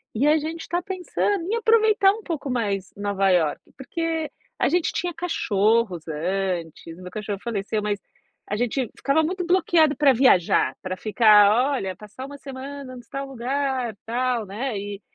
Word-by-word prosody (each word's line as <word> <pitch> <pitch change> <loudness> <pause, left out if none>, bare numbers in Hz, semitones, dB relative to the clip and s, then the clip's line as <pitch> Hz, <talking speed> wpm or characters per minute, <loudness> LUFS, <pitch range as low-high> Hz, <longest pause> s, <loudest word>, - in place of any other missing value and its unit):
e 245 +6 +1
a 310 +1 +5
gente 320 +2 -5
está 345 +2 -2
pensando 375 +1 -1
em 430 +5 -1
aproveitar 440 -3 +4
um 440 -1 -9
pouco 295 -5 -4
mais 200 -6 -2
Nova 200 -1 0
Iorque". 160 -5 0
Porque 325 +3 -3 0.3
a - - +3
gente 350 +1 +1
tinha 345 +1 -2
cachorros 220 - 0
antes, 170 0 -3
o 185 - -13
meu 180 - -9
cachorro 210 -2 -4
faleceu, 215 -2 -2
mas 205 -1 -1 0.5
a 205 - -1
gente 245 +1 -1
ficava 280 +3 +2
muito 360 +2 -2
bloqueado 335 -4 +3
para 285 -3 +5
viajar, 230 -9 +4
para 185 0 -4
ficar: 215 +4 +5
"Olha, 190 -8 -3
passar 215 +5 -9
uma 285 0 -9
semana 275 0 -8
em - - -9
tal 275 0 -4
lugar, 260 -1 -2
tal", 240 -1 -1
né, 215 +4 -4
e 200 0 -6
250 Hz, 165 wpm, -24 LUFS, 205-315 Hz, 0.5 s, a